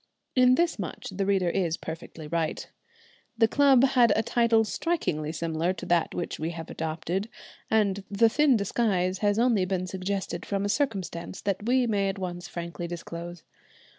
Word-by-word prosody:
In 255 0 +6
this 340 -5 +1
much 180 -5 -5
the 195 +1 -2
reader 190 -3 +2
is 170 -3 0
perfectly 160 -1 -8
right. 160 0 -2 0.7
The 225 -1 +5
club 270 0 +5
had 250 -4 +5
a 220 - +2
title 230 -1 +3
strikingly 195 - -1
similar 165 +2 -1
to 185 - -8
that 175 -2 +1
which 175 - -4
we 160 +2 -2
have 165 -1 -7
adopted, 165 +6 -3 0.4
and 200 -3 +2
the 205 +3 +4
thin 280 +1 +4
disguise 190 -3 0
has 205 -1 +2
only 230 -4 +3
been 185 0 -1
suggested 185 -1 -3
from 200 0 -2
a - - -1
circumstance 195 - -2
that 200 +2 -2
we 255 0 +3
may 200 -4 +1
at 195 - -4
once 175 -2 -5
frankly 170 0 -5
disclose. 170 0 -7
190 Hz, 165 wpm, -27 LUFS, 170-225 Hz, 0.7 s, In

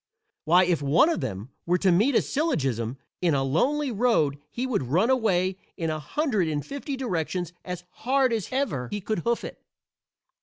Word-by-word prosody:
Why, 175 +4 +6
if 175 -4 +1
one 145 - +4
of 335 - -1
them 100 +7 -5 0.2
were 180 +1 +3
to 190 0 +3
meet 220 +10 +3
a - - +4
syllogism 135 - -1 0.2
in 170 -5 +2
a 135 - +1
lonely 260 - +1
road 200 - +2
he 245 - -3
would 255 -9 0
run 185 - +3
away 190 -7 +1 0.2
in 165 -3 -1
a 155 - -3
hundred 215 - 0
and 150 -2 -2
fifty 280 0 -5
directions 180 - -2
as 180 -1 -6 0.2
hard 260 -1 +2
as 220 -4 -1
ever 235 - -1
he 205 - -3
could 210 0 -2
hoof 235 +6 -1
it. - - -8
185 Hz, 185 wpm, -26 LUFS, 155-255 Hz, 0.2 s, Why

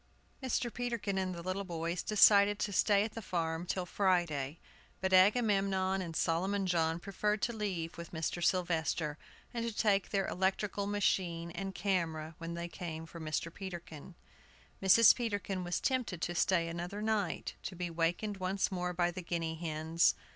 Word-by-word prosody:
Mr. 245 -2 -1
Peterkin 235 -5 -2
and 185 -1 -2
the 170 - -7
little 185 +2 -2
boys 170 -1 -3
decided 205 -1 +6
to 205 - -2
stay 205 +1 +4
at 215 - -3
the 225 - -6
farm 165 -3 -2
till 185 0 -1
Friday. 170 -7 0 0.4
But 190 0 -1
Agamemnon 195 -2 +3
and 165 -3 -6
Solomon 190 +5 +1
John 165 -2 +1
preferred 210 +3 -1
to 235 - +1
leave 185 -7 -3
with 170 - -8
Mr. 165 +1 -2
Sylvester, 160 -4 0 0.3
and 235 -1 -2
to 230 - -1
take 205 -2 +1
their 195 -1 +1
electrical 195 +2 -1
machine 180 -4 0
and 195 +2 -5
camera 165 -5 -1
when 165 0 -5
they 170 0 -4
came 165 -2 -6
for 170 +1 -10
Mr. 160 +1 -3
Peterkin. 175 -6 -8 0.7
Mrs. 200 +4 +8
Peterkin 205 -5 -2
was 175 0 -1
tempted 255 -10 -1
to 175 - -1
stay 175 -1 +2
another 175 +5 -4
night, 215 -4 -1
to 190 - -6
be 175 -1 -4
wakened 170 +5 -1
once 190 +2 -1
more 180 -1 -2
by 175 0 +1
the 185 +1 -6
guinea 170 -2 -2
hens. 160 0 +1
185 Hz, 165 wpm, -33 LUFS, 170-200 Hz, 0.7 s, Mrs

